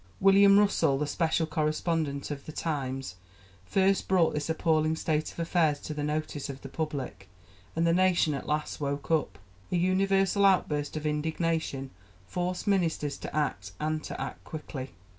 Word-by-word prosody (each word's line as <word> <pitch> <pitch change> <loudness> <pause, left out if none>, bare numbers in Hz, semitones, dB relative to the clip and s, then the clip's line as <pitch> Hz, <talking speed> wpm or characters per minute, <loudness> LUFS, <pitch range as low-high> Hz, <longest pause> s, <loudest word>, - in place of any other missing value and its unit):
William 200 +1 +7
Russell, 200 -9 +3
the 150 - 0
special 160 +2 +1
correspondent 155 -2 -1
of 140 -1 -6
The - - -5
Times, 135 - -3 0.5
first 195 - +2
brought 180 -4 +3
this 150 +1 -2
appalling 160 -1 +2
state 155 -1 -1
of - - -17
affairs 165 -3 +1
to 155 - -5
the 150 -1 -3
notice 150 -1 -2
of 135 -1 -7
the 135 - -7
public, 135 - -4 0.5
and 165 +1 +2
the 165 - +4
nation 180 -3 +3
at 135 - -5
last 150 0 -2
woke 140 +1 -3
up. 160 -2 +1 0.3
A - - +1
universal 195 +2 +2
outburst 155 -7 +2
of 155 - -5
indignation 155 -2 -1 0.3
forced 180 - -3
ministers 165 -7 0
to - - -7
act, 100 -11 -1
and 155 0 -1
to - - -6
act - - -5
quickly. 140 -4 -6
155 Hz, 160 wpm, -29 LUFS, 145-175 Hz, 0.5 s, William